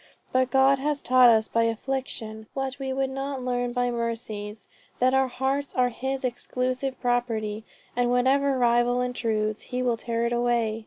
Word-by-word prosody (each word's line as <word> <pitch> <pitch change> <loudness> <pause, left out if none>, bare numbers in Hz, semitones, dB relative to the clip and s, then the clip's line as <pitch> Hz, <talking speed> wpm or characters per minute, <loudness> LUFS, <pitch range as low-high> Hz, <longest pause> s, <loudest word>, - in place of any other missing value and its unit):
But 255 0 +2
God 270 0 +4
has 290 +1 -1
taught 255 -2 +6
us 220 -1 +4
by 230 0 +1
affliction, 225 -2 -4
what 270 0 -3
we 265 -1 -3
would 265 0 -1
not 270 -1 -4
learn 245 -1 -1
by 245 0 0
mercies 225 -3 -4 0.3
that 255 +1 +3
our 265 0 +3
hearts 265 +2 -2
are 250 -1 +3
his 265 +3 -4
exclusive 255 +1 -2
property, 225 -3 -1 0.3
and 245 0 +1
whatever 265 +2 +2
rival 240 0 +3
intrudes, 220 -4 -1
he 250 0 -2
will 240 -2 +1
tear 230 0 -2
it 235 - 0
away." 235 -2 +1
245 Hz, 165 wpm, -26 LUFS, 230-265 Hz, 0.3 s, taught